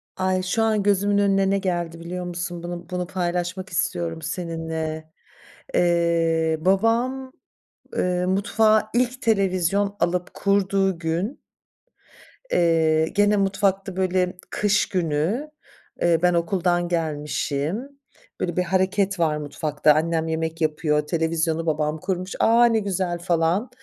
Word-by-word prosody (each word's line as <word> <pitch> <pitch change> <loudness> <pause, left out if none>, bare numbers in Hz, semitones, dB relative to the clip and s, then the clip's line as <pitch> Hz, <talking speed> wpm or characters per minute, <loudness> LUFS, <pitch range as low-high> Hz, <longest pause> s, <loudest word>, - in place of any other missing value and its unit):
Ay! 185 0 0
Şu 220 +5 0
an 215 -2 +1
gözümün 205 0 +2
önüne 195 -1 +3
ne 200 - +2
geldi 175 -3 -2
biliyor 180 +2 -5
musun? 175 0 -5
Bunu 175 0 -6
bunu 180 -1 -3
paylaşmak 180 0 -3
istiyorum 90 - -2
seninle. 160 -1 -4 0.7
Eee, 165 -2 +2
babam, 235 - +1 0.6
ııı, 180 0 0
mutfağa 215 +3 +2
ilk 250 +1 0
televizyon 195 -1 +1
alıp 180 0 -1
kurduğu 195 -2 +1
gün 170 - -2 1.1
eee, 160 -2 +3
gene 205 0 +4
mutfakta, 195 -1 0
böyle, 185 -1 0
kış 210 0 +1
günü, 180 - -1 0.5
eee, 170 -2 +3
ben 180 0 +3
okuldan 175 0 +1
gelmişim, 155 - -2 0.5
böyle, 175 -1 -2
bir 180 - +3
hareket 190 +1 0
var 155 -2 +2
mutfakta 150 0 +1
annem 165 +1 0
yemek 160 0 -3
yapıyor, 150 -1 +1
televizyonu 165 0 0
babam 155 -1 -1
kurmuş. 185 0 -3
"A! 235 +2 +5
Ne 230 -2 +3
güzel." 185 -4 -2
falan. 175 +6 0
180 Hz, 120 wpm, -23 LUFS, 165-195 Hz, 1.1 s, A